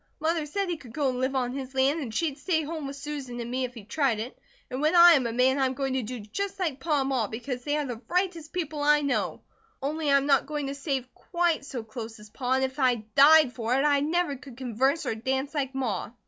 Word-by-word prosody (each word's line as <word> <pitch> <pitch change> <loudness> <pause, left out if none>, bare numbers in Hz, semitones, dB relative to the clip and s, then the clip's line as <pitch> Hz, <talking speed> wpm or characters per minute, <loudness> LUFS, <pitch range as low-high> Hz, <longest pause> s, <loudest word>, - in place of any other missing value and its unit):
Mother 315 -1 0
said 395 +6 -2
he 345 -2 -2
could 250 -6 -13
go 285 -3 +1
and 250 -1 -3
live 260 +1 0
on 250 -1 0
his 265 -1 -6
land, 270 +4 +3
and 260 -7 -5
she'd 290 +4 -1
stay 320 -1 0
home 310 -1 -5
with 275 - -6
Susan 275 -4 -6
and 235 0 -5
me, 255 +1 0
if 250 0 -9
he 225 - -9
tried 240 0 0
it. 235 +4 -5 0.4
And 255 +2 -3
when 310 +3 +2
I 345 0 +10
am 270 -7 +4
a - - -3
man 255 +3 +3
I 265 - +3
am 260 - -4
going 270 -1 -1
to 260 - 0
do 245 +2 -6
just 390 - -4
like 315 -7 -1
Pa 295 -1 +1
and 270 - -1
Ma 250 -6 +1
because 245 +3 -5
they 290 +2 0
are 300 - -1
the 240 -3 -6
rightest 350 -3 -1
people 315 -4 -3
I 295 0 +4
know, 280 -1 -1 0.4
only 295 +2 -2
I 280 - +7
am 275 - 0
not 275 -2 +3
going 295 -1 -3
to 275 - -3
save 275 -3 -2
QUITE 340 -4 -1
so 255 -5 -5
close 225 0 -8
as 210 0 -14
Pa, 255 +2 -1
and 265 0 +2
if 265 +2 -3
I 255 -2 +4 0.2
died 290 -1 +7
for 235 +1 -1
it, 270 - +2
I 290 -1 +4
never 315 +1 0
could 255 -2 -13
converse 265 +5 0
or 250 - 0
dance 265 +5 -2
like 275 -3 -2
Ma." 255 -7 -2
275 Hz, 265 wpm, -27 LUFS, 250-300 Hz, 0.4 s, I